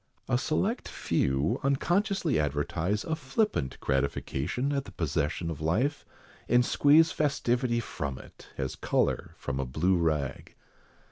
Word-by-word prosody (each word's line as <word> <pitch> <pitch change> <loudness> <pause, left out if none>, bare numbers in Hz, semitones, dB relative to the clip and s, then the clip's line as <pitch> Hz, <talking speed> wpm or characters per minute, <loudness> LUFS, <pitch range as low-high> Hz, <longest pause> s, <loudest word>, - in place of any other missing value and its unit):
A - - +2
select 185 - -1
few, 65 +3 0
unconsciously 175 - +1
advertise 85 +7 -1
a 160 - -1
flippant 135 - -1
gratification 70 - -1
at 140 -1 -1
the 100 - -10
possession 80 0 -1
of 75 -2 -7
life, 115 - 0 0.4
and 120 +1 +5
squeeze 155 +5 +5
festivity 125 -5 +1
from 70 - -4
it, - - -14
as 65 -1 -3
colour - - 0
from 65 - -4
a 65 - -1
blue 90 +8 +2
rag. 75 -5 -1
95 Hz, 130 wpm, -29 LUFS, -, 0.4 s, and